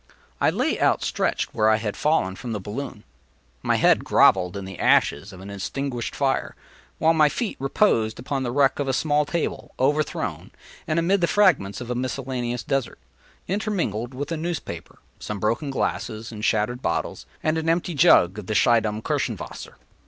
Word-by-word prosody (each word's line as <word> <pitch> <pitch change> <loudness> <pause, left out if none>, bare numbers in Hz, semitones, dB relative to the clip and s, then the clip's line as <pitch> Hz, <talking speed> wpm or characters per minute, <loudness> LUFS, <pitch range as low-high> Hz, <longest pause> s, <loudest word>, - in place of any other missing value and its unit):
I - - +4
lay - - -1
outstretched - - 0
where 110 0 +3
I 110 - +5
had 110 -2 -3
fallen 125 -12 +1
from 120 +2 -5
the 105 - -3
balloon. 105 +3 -6 0.6
My - - +1
head - - +4
grovelled 90 0 +4
in 100 - -6
the 95 -3 -9
ashes 95 +9 +2
of 95 -1 -12
an 100 +1 -8
extinguished 120 +6 -4
fire, 135 -1 0 0.4
while 165 +1 +4
my 155 -2 +5
feet 225 +7 -3
reposed 135 - +2
upon 135 +2 -3
the 125 - -2
wreck 140 +1 +2
of 140 - -1
a 135 - +1
small 150 +1 +2
table, 170 0 -3
overthrown, 145 +4 -1 0.4
and 155 - 0
amid 180 +3 +2
the 170 - +3
fragments 155 - +2
of 125 0 -5
a - - +1
miscellaneous 125 -1 -3
dessert, 135 0 -2 0.5
intermingled 175 - -2
with 145 +4 -4
a 165 - -1
newspaper, 155 - -5 0.2
some 105 -1 -5
broken 115 +8 0
glass 135 - -1
and 110 0 -8
shattered 115 +3 +1
bottles, - - -2 0.2
and 155 +1 +1
an 160 0 -1
empty 170 +1 0
jug 110 - +5
of 100 - -9
the 110 - -2
Schiedam 110 0 +2
Kirschenwasser. - - -3
125 Hz, 175 wpm, -24 LUFS, 105-150 Hz, 0.6 s, I